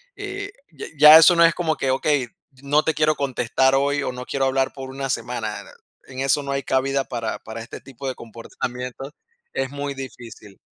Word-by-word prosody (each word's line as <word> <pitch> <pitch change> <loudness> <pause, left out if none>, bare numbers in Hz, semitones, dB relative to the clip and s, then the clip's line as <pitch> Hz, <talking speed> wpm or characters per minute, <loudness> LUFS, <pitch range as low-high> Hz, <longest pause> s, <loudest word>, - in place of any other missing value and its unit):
eh, 405 0 -6 0.2
ya 150 - -8
ya 150 +2 +10
eso 165 +2 +7
no 170 0 +6
es 165 - +4
como 160 -3 -1
que: 135 - -1
"Okey, 135 -1 +1 0.3
no 145 +2 +2
te 160 - 0
quiero 155 0 +2
contestar 130 -1 +1
hoy, 140 +1 +1
o, - - -2
no 125 0 -8
quiero 135 0 -1
hablar 135 0 0
por 135 -1 -8
una 135 0 -5
semana". 120 -4 -3 0.4
En 130 0 -9
eso 135 +2 +1
no 140 - -4
hay 140 0 -2
cabida 135 +1 0
para 115 -3 -4
para 110 +1 -8
este 115 - -9
tipo 135 0 -9
de 130 - -3
comportamientos, 125 +3 -7 0.4
es 135 0 -2
muy 145 0 -4
difícil. 120 -6 -10
135 Hz, 195 wpm, -22 LUFS, 125-145 Hz, 0.4 s, ya